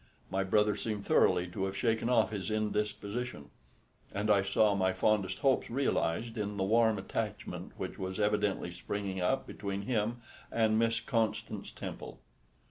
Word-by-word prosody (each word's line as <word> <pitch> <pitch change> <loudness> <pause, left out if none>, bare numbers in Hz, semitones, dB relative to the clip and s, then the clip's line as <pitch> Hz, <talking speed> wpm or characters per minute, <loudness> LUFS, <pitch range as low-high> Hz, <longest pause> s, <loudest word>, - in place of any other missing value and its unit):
My 95 0 +1
brother 105 +2 +3
seemed 105 -3 -3
thoroughly 90 - +4
to 95 +2 -2
have 95 0 -4
shaken 115 +2 +1
off 115 -3 +3
his 100 -3 -3
indisposition; 105 - -2 0.6
and 105 +1 0
I 100 -1 +5
saw 105 +1 +3
my 95 -1 +2
fondest 100 0 +1
hopes 135 -2 +2
realised 115 -3 0
in 105 -1 -2
the 95 - +1
warm 110 +2 +4
attachment 95 - -4
which - - -5
was 95 +1 -4
evidently 105 -3 +1
springing 95 +2 -4
up 130 +9 +1
between 100 -1 -4
him 115 0 -1 0.3
and 110 -1 +3
Miss 115 0 +2
Constance 115 -4 -1
Temple. - - -7
105 Hz, 150 wpm, -32 LUFS, 95-115 Hz, 0.6 s, I